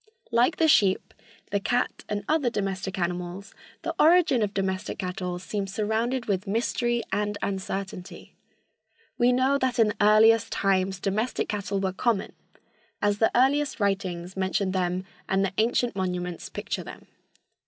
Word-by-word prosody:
Like 245 +7 +3
the 325 - +3
sheep, 200 -11 +3 0.4
the 200 - +1
cat 245 +5 -1
and 205 -1 -2
other 305 -6 +2
domestic 195 -3 -3
animals, 180 +2 -3 0.3
the - - -2
origin 330 -6 +5
of 205 -2 0
domestic 190 0 -2
cattle 180 -1 -3
seems 195 +1 -4
surrounded 225 +5 -1
with 200 0 -1
mystery 240 +2 0
and 210 0 -1
uncertainty. 190 -1 -5 0.9
We 245 +1 +5
know 260 +3 +2
that 260 -2 0
in 220 -3 +4
earliest 220 +2 +5
times 190 -1 +1
domestic 215 +6 -1
cattle 200 -1 -2
were 190 -1 -1
common, 210 0 0 0.7
as 205 0 +1
the 225 - +4
earliest 275 +3 +2
writings 190 -3 -1
mention 190 0 0
them 185 0 -1 0.2
and 195 0 +2
the 195 - -3
ancient 235 0 +1
monuments 180 -2 -3
picture - - -4
them. - - -11
200 Hz, 145 wpm, -26 LUFS, 190-235 Hz, 0.9 s, origin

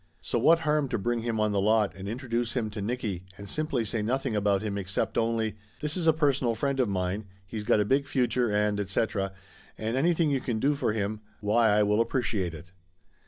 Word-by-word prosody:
So 90 +8 -1
what 165 +7 +5
harm 150 -3 +1
to - - 0
bring 120 +3 -1
him 115 -1 -2
on 105 0 +2
the 100 -1 +1
lot 105 0 +3
and 95 0 -8
introduce 120 0 -2
him 110 -4 -1
to 105 0 -5
Nicky 105 -4 -3
and 100 - -9
simply 140 -1 -1
say 110 +1 -1
nothing 130 +2 -1
about 100 -1 +2
him 105 -2 -2
except 95 -1 -2
only, 115 -2 0 0.2
'This 150 0 -2
is 175 -3 0
a - - +8
personal 140 -6 +1
friend 135 +3 -1
of 125 -5 +2
mine, 95 +2 -2 0.2
he's 105 +3 -5
got 105 - +3
a 105 - +2
big 140 +5 +2
future 125 -3 +1
and 105 0 +1
etc. 100 0 -1 0.5
and 110 +2 -2
anything 160 +2 +2
you 135 -2 +1
can 120 -3 -2
do 140 +6 +3
for 140 -6 0
him, 105 0 -2 0.2
why 110 +2 +3
I 105 0 +4
will 105 +2 +3
ap 115 - +1
preciate 100 -9 -1
it 85 +4 -12
110 Hz, 220 wpm, -28 LUFS, 105-130 Hz, 0.5 s, a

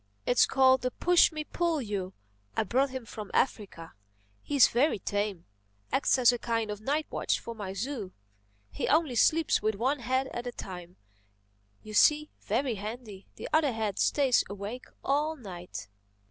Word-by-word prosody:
It's 245 - +4
called 260 -1 +4
the 255 - 0
'pushmi 330 +2 +3
pullyu.' 225 - -2 0.4
I - - +3
brought 260 +6 +1
him 260 -2 -6
from 215 -2 -8
Africa. 190 -10 -1 0.5
He's 280 -4 +5
very 265 +4 +2
tame—acts 165 - -2
as 245 -2 +6
a 245 - -3
kind 230 -2 -1
of 210 0 -6
night 295 +6 0
watchman - - -1
for 235 - -6
my 205 -4 -6
zoo. 215 -1 -4 0.6
He 95 - -3
only 310 -4 +2
sleeps 315 +7 +3
with 215 0 0
one 260 +7 0
head 260 +2 0
at 240 +1 -5
a - - -3
time, 180 -5 -9 0.9
you 215 - -9
see—very 275 -2 +2
handy—the 210 -1 -8
other 305 -4 +3
head 215 -3 -2
stays 270 -4 +3
awake 205 +5 -6 0.2
all 300 +3 +1
night." 180 - -8
235 Hz, 145 wpm, -29 LUFS, 200-270 Hz, 0.9 s, as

